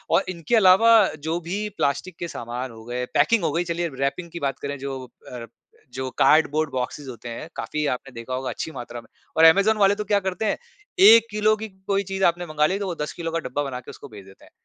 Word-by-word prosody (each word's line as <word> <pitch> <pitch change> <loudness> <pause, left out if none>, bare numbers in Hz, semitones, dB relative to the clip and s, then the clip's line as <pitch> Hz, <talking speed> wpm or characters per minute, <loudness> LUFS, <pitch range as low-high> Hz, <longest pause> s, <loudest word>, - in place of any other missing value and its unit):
और - - +3
इनके 175 +5 -1
अलावा 210 +2 +6 0.3
जो 160 +3 -2
भी 195 +5 -3
प्लास्टिक 160 +5 -1
के 175 - -3
सामान 120 -2 -6
हो 110 0 -13
गए, 125 +1 -3
पैकिंग 195 +8 +3
हो 160 - +1
गई 170 +4 0
चलिए 170 0 -2
रैपिंग 140 +6 -2
की 170 - -6
बात 135 -2 -2
करें 140 0 -5
जो 135 -1 -5 0.3
अ, 125 - -7
रप 115 -1 -9 0.4
जो 130 0 -4
कार्डबोर्ड 155 +1 +3
बॉक्सेज़ 130 +2 -4
होते 120 -1 -8
हैं, 115 +6 -7
काफ़ी 150 0 -3
आपने 130 +2 -4
देखा 115 +2 -7
होगा 130 0 -3
अच्छी 160 - -5
मात्रा 120 -3 -8
में, - - -22 0.3
और 165 - +7
ऐमेज़ॉन 200 +6 +5
वाले 200 -1 +4
तो 210 - -4
क्या 205 0 +2
करते 190 +2 -3
हैं - - 0 0.5
1 225 +2 +8
किलो 215 +1 +2
की 220 +1 -6 0.2
कोई 200 0 +1
चीज 195 0 -4
आपने 175 +1 +2
मँगा 155 -2 +1
ली 195 +2 -2
तो 200 - -3
वो 175 - -3
10 150 - -3
किलो 165 -1 -5
का 165 - -1
डब्बा 145 - -2
बना 130 -3 -5
के 125 - -14
उसको - - -12
भेज 105 -3 -12
देते 95 0 -17
हैं, - - -21
160 Hz, 245 wpm, -23 LUFS, 130-190 Hz, 0.5 s, 1